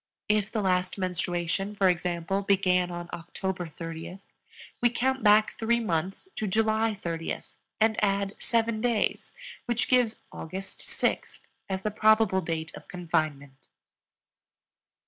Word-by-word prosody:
If 210 -1 +2
the 215 -3 -1
last 185 0 +1
menstruation, 180 +1 -1
for 195 -2 +4
example, 175 +1 0
began 185 -2 +3
on 175 0 -5
October 180 +1 -4
30th, 165 +3 -7 0.6
we 240 - +5
count 265 +3 0
back 215 0 +6
three 235 +1 +2
months 185 - -2
to 215 - -1
July 220 +1 +2
30th 165 -2 -4 0.3
and 220 0 +3
add 200 0 +1
seven 230 -1 +1
days, 235 -3 0 0.4
which 240 0 0
gives 245 -3 +2
August 190 +4 -7
6th - - -2 0.3
as 190 0 -2
the 215 - 0
probable 215 -2 +4
date 160 -1 -3
of - - -11
confinement. 155 -6 -2
195 Hz, 125 wpm, -28 LUFS, 175-220 Hz, 0.6 s, back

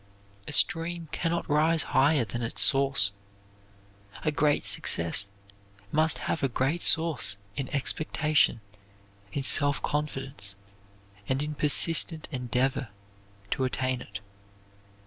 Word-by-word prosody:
A - - -5
stream 165 +2 +1
can 165 - -2
not 170 0 -3
rise 155 +2 +2
higher 140 -1 +3
than 120 +3 -6
its 115 - +2
source. 135 -8 +3 1.1
A 155 - +1
great 150 0 +1
success 85 +4 +2 0.6
must 155 +1 +1
have 160 - -2
a 135 - 0
great 135 +8 -1
source 160 -10 +3 0.2
in 135 -2 -4
expectation, 150 -2 0 0.7
in 140 - -3
self 145 +1 +3
confidence, 135 -8 -4 0.7
and 135 +2 0
in 150 0 -4
persistent 155 +2 +2
endeavor 130 0 -2 0.6
to 130 - -1
attain 130 0 -2
it. 100 0 -9
140 Hz, 115 wpm, -27 LUFS, 130-155 Hz, 1.1 s, higher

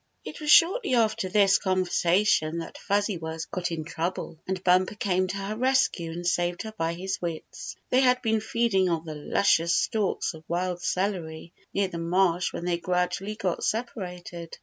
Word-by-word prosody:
It 310 - -8
was 300 - -3
shortly 340 - +5
after 215 -5 +1
this 200 0 +4
conversation 185 -2 +2
that 165 - -7
Fuzzy 205 -2 0
Wuzz 160 0 -5
got 175 +1 -3
in 160 -1 -3
trouble, 165 0 -4
and 190 -1 -3
Bumper 185 +3 +3
came 185 -4 0
to 195 - -4
her 200 +2 -4
rescue 255 -9 +1
and 175 +2 -6
saved 175 0 0
her 220 - -6
by 165 -3 -1
his 190 +2 -4
wits. 170 -2 -6 0.2
They 255 - +5
had 250 -1 +4
been 220 -2 +1
feeding 220 -4 +1
on 165 -1 -1
the 155 - -5
luscious 170 +2 +2
stalks 215 -6 0
of 160 -1 -12
wild 175 +1 -2
celery 175 -4 -2 0.2
near 200 -1 +1
the 170 -2 -6
marsh 175 +1 +1
when 175 - -5
they 175 -1 0
gradually 180 +3 -1
got 190 -6 -2
separated. 180 -7 -4
185 Hz, 175 wpm, -27 LUFS, 170-210 Hz, 0.2 s, shortly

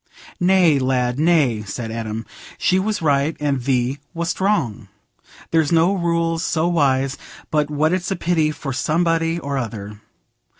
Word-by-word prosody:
"Nay, 180 -5 +4
lad, 130 -1 0
nay," 150 -9 +3
said 110 +3 -5
Adam, 110 -1 -4 0.3
"she 185 - +2
was 205 -2 -2
right 145 +1 +1
and 140 -3 0
thee 130 +1 0 0.2
wast 170 +2 -2
wrong. 130 - 0 0.6
There's 160 -2 +2
no 170 +3 +4
rules 170 -2 0
so 160 +1 0
wise 135 -5 +1 0.3
but 150 -1 +1
what 155 +3 +1
it's 185 -1 -1
a 195 - 0
pity 165 -3 +1
for 145 -2 -5
somebody 165 +3 +1
or 140 -4 -3
other. 105 -3 -6
150 Hz, 145 wpm, -21 LUFS, 130-170 Hz, 0.6 s, Nay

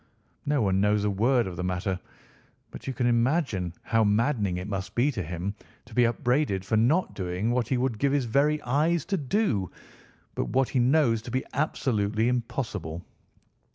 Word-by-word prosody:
No 145 -4 +2
one 95 -1 +2
knows 105 0 +2
a 105 - +1
word 120 +5 +2
of 90 -2 -6
the 90 - -3
matter, 90 +1 -2 0.7
but - - -10
you 135 - -2
can 125 - 0
imagine 120 - +1
how 115 -1 +2
maddening 105 -2 +1
it 90 +2 -5
must 100 0 -4
be 130 +5 +3
to 105 - -3
him 90 +4 -4 0.3
to 115 - -15
be 120 +1 +4
upbraided 120 -5 0
for 110 - 0
not 130 +12 +2
doing 95 +4 -2
what 120 -1 0
he 130 - 0
would 120 -3 -1
give 140 -1 +2
his 140 -3 +1
very 145 +6 +2
eyes 150 +6 +1
to 195 - -1
do, 135 - 0 0.6
but - - -2
what 135 0 +1
he 130 - 0
knows 125 -3 +3
to 120 - -9
be 130 +2 -2
absolutely 110 -7 0
impossible. 110 - -3
115 Hz, 185 wpm, -27 LUFS, 100-135 Hz, 0.7 s, be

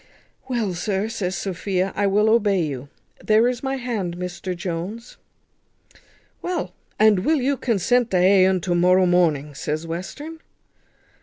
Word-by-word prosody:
"Well, 230 -7 -1
sir," 195 +4 -2
says 195 -5 -3
Sophia, 190 0 -2
"I 205 0 +1
will 210 +2 +3
obey 210 -4 +3
you. 140 -2 -5 0.3
There 220 +2 +4
is 250 0 -2
my 270 0 -2
hand, 220 -9 -3
Mr 180 0 -5
Jones." 185 +7 -5 1.2
"Well, 335 - -3 0.2
and 215 -2 +5
will 305 +10 +1
you 275 +2 +1
consent 245 0 +1
to 190 - +1
ha 185 +1 +5
un 185 -1 0
to 175 +1 -1
morrow 180 +2 +4
morning?" 160 -5 +2
says 155 +3 -4
Western. 290 - -6
195 Hz, 145 wpm, -22 LUFS, 180-230 Hz, 1.2 s, and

